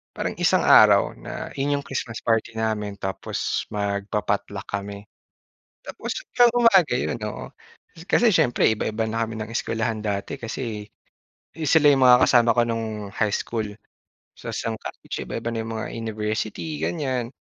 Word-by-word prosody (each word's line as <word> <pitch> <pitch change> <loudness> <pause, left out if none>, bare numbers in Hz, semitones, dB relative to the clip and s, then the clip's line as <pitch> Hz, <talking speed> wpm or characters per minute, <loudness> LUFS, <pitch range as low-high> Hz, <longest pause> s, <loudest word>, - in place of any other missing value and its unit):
parang - - -3
isang - - +3
araw - - +6
na - - -7
yun 145 +1 +1
'yong - - -9
Christmas 120 -3 -5
party 115 -1 0
namin 105 -2 -2
tapos 95 0 -3
magpa-potluck 100 -1 -2
kami. 100 0 -5 0.8
Tapos, - - -6 0.2
sa 245 - +7
umaga 230 - +5
'yon, 125 - -1
oo. 105 - -5 0.6
Kasi 235 +5 +3
siyempre 155 - +3
iba-iba 110 0 -1
na 115 +1 -1
kami 110 0 -6
ng 110 - -5
eskuwelahan 110 -2 -2
dati 105 +7 -2
kasi 115 -3 -5 0.7
eh, 160 - -3
sila 150 0 +6
'yung 135 -2 +4
mga 125 0 +7
kasama 120 -2 +5
ko 120 - +4
no'ng 110 -3 -3
high 105 0 0
school. 110 -2 -2 0.7
Tas - - -6
no'ng 115 - -1
college - - -7
iba-iba 115 - -4
na 115 - -3
'yong 115 0 -5
mga 110 - -3
university 110 +6 -3
ganyan. 130 -7 -2
115 Hz, 150 wpm, -24 LUFS, 105-125 Hz, 0.8 s, sa